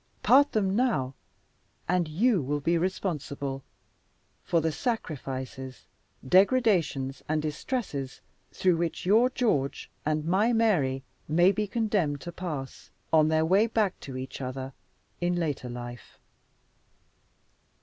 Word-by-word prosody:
Part 285 +2 +5
them 195 -3 +1
now 220 - +1 0.7
and 180 -1 +1
YOU 195 +5 +2
will 145 +2 -1
be 165 +4 +1
responsible 150 -6 -2 0.8
for 170 - +2
the 160 0 0
sacrifices, 135 - -4 0.4
degradations 185 - +3
and 155 0 +1
distresses 150 - -3 0.3
through 180 -3 +2
which 170 0 -2
your 225 +7 +5
George 210 - -1
and 155 0 -1
my 200 +8 +2
Mary 155 - +2 0.2
may 175 +5 +5
be 210 +1 -1
condemned 200 -9 0
to 175 - -6
pass 155 -7 -6 0.2
on 155 -1 +6
their 160 0 +2
way 195 +7 +4
back 215 -4 0
to 130 -2 -7
each 130 +1 -6
other 130 +1 -5 0.5
in 175 0 +1
later 150 -7 -2
life. 120 -1 -8
165 Hz, 120 wpm, -28 LUFS, 135-200 Hz, 0.8 s, on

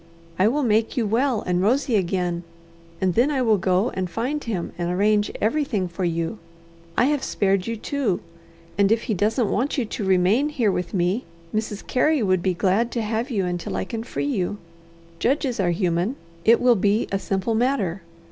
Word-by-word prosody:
I 190 - +5
will 285 +6 +1
make 220 0 +1
you 235 - +2
well 235 +2 +1
and 180 0 0
rosy 245 +4 +2
again, 180 -2 0 0.6
and 185 -1 +1
then 245 - +3
I 270 -3 +1
will 220 -4 +3
go 190 +4 +1
and 185 -1 -3
find 255 - -2
him, 200 -7 -3
and 175 0 -2
arrange 205 +3 +2
everything 220 -5 0
for 175 +2 -5
you. 170 +4 -1 0.6
I - - +5
have 290 0 +1
spared 195 -1 0
you, 230 0 -2
too, 240 -4 -1 0.6
and 200 0 +4
if 225 0 +2
he 225 - -1
doesn't 210 +3 +1
want 275 +5 0
you 255 - +1
to 210 - -5
remain 190 +9 +3
here 245 -9 +1
with 180 +1 -3
me, 185 +6 0 0.3
Mrs. 215 -1 -3
Carey 290 +1 +2
would 185 -3 +2
be 185 0 0
glad 200 +7 +1
to 235 - -1
have 225 +4 -2
you 200 -7 0
until 175 -1 -3
I - - -2
can 225 -1 -4
free 235 - -4
you. 205 -8 -1 0.6
Judges 265 -2 0
are 185 -3 +2
human. 175 +5 0 0.3
It 230 +1 +6
will 245 0 +5
be 205 +2 +1
a 195 - 0
simple 195 +4 -1
matter. 220 -7 0
210 Hz, 195 wpm, -23 LUFS, 185-240 Hz, 0.6 s, It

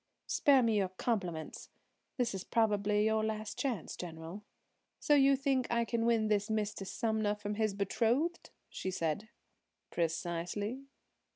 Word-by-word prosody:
"Spare 275 -3 +4
me 225 -2 +2
your 195 -2 +1
compliments. 185 -5 -3 0.5
This 245 -3 0
is 190 -1 -4
probably 210 -2 +2
your 220 0 +2
last 215 -1 -3
chance, 240 - -2
General. 165 +3 -7 0.6
So 295 - +3
you 275 -1 +6
think 270 -2 +1
I 235 0 +2
can 230 0 0
win 225 -2 +3
this 210 0 +1
Mr. 210 -3 -2
Sumner 220 0 0
from 205 0 -4
his 215 -1 0
betrothed?" 240 - 0 0.2
she 190 - -4
said. 180 +3 -2 0.6
"Precisely." 175 +9 -2
215 Hz, 135 wpm, -33 LUFS, 195-235 Hz, 0.6 s, you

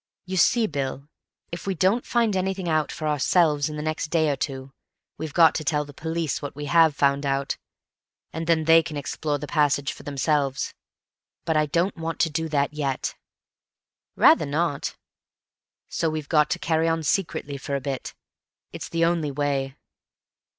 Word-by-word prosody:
You 185 0 -4
see, 225 +6 +4
Bill, 140 -4 -4 0.4
if 170 +3 -6
we 195 - 0
don't 190 +8 +2
find 230 -4 +2
anything 190 -1 -1
out 155 -2 +1
for 155 - -4
ourselves 150 0 +2
in 150 - -6
the 150 - -4
next 155 0 -2
day 160 -1 +2
or - - 0
two, 135 -1 -5 0.5
we've 160 -1 -4
got 165 +1 +6
to 155 - -3
tell 150 0 0
the 145 - -12
police 160 +1 -2
what 145 -2 -6
we 145 0 -5
have 160 -1 +4
found 140 0 +2
out, 135 0 -1 0.8
and 160 +1 -4
then 165 -1 +3
they 165 +1 +6
can 160 -2 -6
explore 145 +1 -2
the 145 - -6
passage 145 -2 +1
for - - -13
themselves. 140 -1 -1 0.7
But 160 - 0
I 155 0 +3
don't 170 +6 0
want 165 -1 -4
to 165 - +2
do 160 +1 -2
that 145 -1 0
yet." 140 -3 -2 1.0
"Rather 150 - +5
not." 145 0 -1 0.9
"So 165 - -1
we've 155 -2 -4
got 150 -2 +4
to - - 0
carry 160 0 +1
on 165 0 0
secretly 150 -4 -1
for 140 +1 -4
a - - 0
bit. 135 -1 -5 0.6
It's - - -7
the 165 0 +2
only 165 -3 +1
way." 140 -1 -1
155 Hz, 180 wpm, -25 LUFS, 145-165 Hz, 1.0 s, got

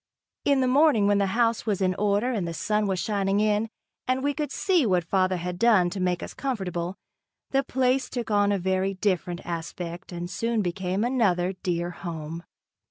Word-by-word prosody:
In 280 -2 +3
the 255 - +2
morning, 270 -5 +4
when 205 0 +3
the 200 - +2
house 230 -1 +1
was 205 -3 +1
in 185 -1 +2
order 205 +5 +1
and 200 -8 -1
the 165 - -4
sun 210 +6 0
was 190 -2 -1
shining 200 -1 0
in, 215 +1 +1 0.4
and 255 +1 0
we 285 0 +1
could 295 0 -3
see 365 -5 +2
what 185 -6 +2
father 185 +1 +1
had 175 +1 -4
done 205 -7 +4
to 195 - -4
make 180 -1 0
us - - -7
comfortable, 190 -9 -3 0.6
the 270 0 +2
place 260 0 +1
took 240 -3 -4
on 205 -1 +3
a 200 - +2
very 190 +1 0
different 185 -2 -1
aspect 170 +1 -5
and 175 0 -4
soon 220 +5 -1
became 185 +3 -1
another 195 -8 +1
dear 175 -1 -1
home. 165 -2 -6
195 Hz, 190 wpm, -26 LUFS, 180-230 Hz, 0.6 s, morning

